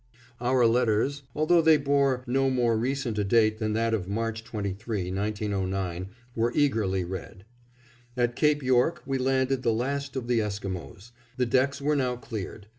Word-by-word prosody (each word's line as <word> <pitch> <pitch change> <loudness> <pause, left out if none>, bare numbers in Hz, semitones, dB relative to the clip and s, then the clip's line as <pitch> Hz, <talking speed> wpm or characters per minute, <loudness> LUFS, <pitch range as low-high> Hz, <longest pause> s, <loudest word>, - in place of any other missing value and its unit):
Our 125 0 +3
letters, 120 +4 +2
although 165 +3 +4
they 160 -1 +6
bore 140 -2 +1
no 135 +1 +1
more 120 -3 +2
recent 120 -1 -1
a - - +2
date 110 +1 +3
than 110 -1 -1
that 115 +1 +1
of 95 -5 -1
March 115 +1 -2
23, 105 -3 -4
1909, 95 -3 -2 0.3
were 115 +1 +1
eagerly 110 -10 +1
read. 95 +1 -7 0.7
At 120 -1 +1
Cape 150 0 +2
York 130 +6 +2
we 135 -1 -1
landed 130 0 +1
the 120 -2 +2
last 140 +4 -2
of 125 -3 -3
the 120 -1 +2
Esquimos. 100 - -5 0.3
The 125 - +2
decks 130 +3 +1
were 150 +2 +1
now 130 -3 0
cleared. 110 -3 -7
120 Hz, 160 wpm, -27 LUFS, 105-135 Hz, 0.7 s, they